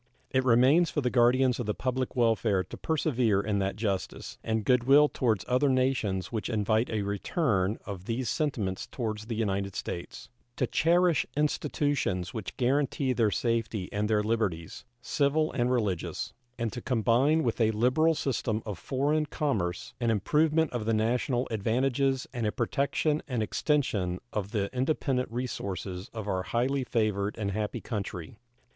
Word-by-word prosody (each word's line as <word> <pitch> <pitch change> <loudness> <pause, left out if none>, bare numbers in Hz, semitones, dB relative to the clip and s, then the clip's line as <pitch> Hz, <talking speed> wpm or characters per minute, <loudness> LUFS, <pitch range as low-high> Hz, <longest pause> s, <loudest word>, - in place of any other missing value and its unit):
It 130 0 +2
remains 130 +8 +5
for 150 - -1
the 125 -2 0
guardians 125 +1 +3
of 120 - -3
the 105 - -1
public 130 0 -2
welfare 115 -5 +2
to 90 - -9
persevere 130 -10 +1
in 100 0 0
that 95 0 -1
justice 100 -3 -3
and 110 -2 -1
good 125 -2 +3
will 145 +3 +7
toward 115 -9 0
other 130 +3 +2
nations 130 -8 0
which 110 -1 -3
invite 110 +1 +1
a 110 -2 -1
return 100 - 0
of 95 -3 -7
these 120 +3 -2
sentiments 105 -9 -1
toward 110 -4 -3
the 110 +2 -5
United 100 -3 -1
States; 85 - -6 0.3
to 125 - +1
cherish 170 +4 +3
institutions 145 - 0
which 110 -5 -6
guarantee 135 +1 +1
their 115 -4 +2
safety 115 -3 -1
and 105 +1 0
their 105 -1 +2
liberties, 105 -7 -2 0.2
civil 150 +4 +1
and 120 0 0
religious; 105 -9 -1 0.2
and 115 -2 -2
to 125 - -5
combine 130 +6 +2
with 115 -1 -1
a 110 - +4
liberal 130 +9 +3
system 115 -6 -1
of 105 -5 -5
foreign 150 +3 0
commerce 105 - -2
an 120 -2 0
improvement 150 - +2
of 120 -3 -3
the 115 0 +2
national 120 +3 0
advantages 130 +5 +1
and 120 -4 -1
a - - +1
protection 140 +6 0
and 125 -5 -1
extension 105 - 0 0.2
of 100 -2 -2
the 105 -3 -1
independent 130 -1 0
resources 100 -6 -4
of 110 -3 -6
our 95 -2 0
highly 130 +7 0
favored 105 -4 0
and 100 -3 -2
happy 105 +1 -2
country. 100 -5 -5
115 Hz, 160 wpm, -29 LUFS, 105-135 Hz, 0.3 s, will